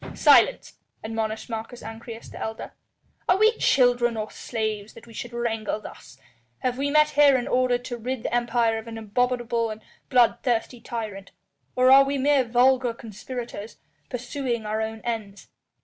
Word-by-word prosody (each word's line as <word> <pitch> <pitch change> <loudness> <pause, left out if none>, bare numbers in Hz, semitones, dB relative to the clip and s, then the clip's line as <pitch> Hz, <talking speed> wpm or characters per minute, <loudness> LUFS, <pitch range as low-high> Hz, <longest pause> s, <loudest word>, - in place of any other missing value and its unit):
"Silence," - - +4 0.2
admonished 220 0 -3
Marcus 225 +1 -6
Ancyrus, 225 +1 -9
the - - -9
elder. 220 0 -6 0.6
"Are 365 - +5
we 435 +3 +4
children 245 -3 +3
or 215 0 -4
slaves 215 -3 -4
that - - -14
we 230 - -15
should 240 +2 -6
wrangle 225 -3 -2
thus? 135 - -12 0.4
Have 250 0 -1
we 285 +1 0
met 300 +1 +4
here 285 -2 +5
in 245 - -3
order 250 -1 +2
to 245 0 -7
rid 245 +1 -4
the - - -3
Empire 235 -2 +1
of 220 - -11
an 225 -1 -7
abominable 235 +1 0
and 215 0 -8 0.3
bloodthirsty 245 -1 +2
tyrant, 215 -5 -6 0.5
or 255 +1 +5
are 275 +1 +9
we 275 +1 -1
mere 275 0 +3
vulgar 245 0 +3
conspirators 230 0 -8 0.3
pursuing 250 -2 -3
our 215 +1 -1
own 220 0 -4
ends? 215 -4 -5
235 Hz, 160 wpm, -25 LUFS, 220-255 Hz, 0.6 s, are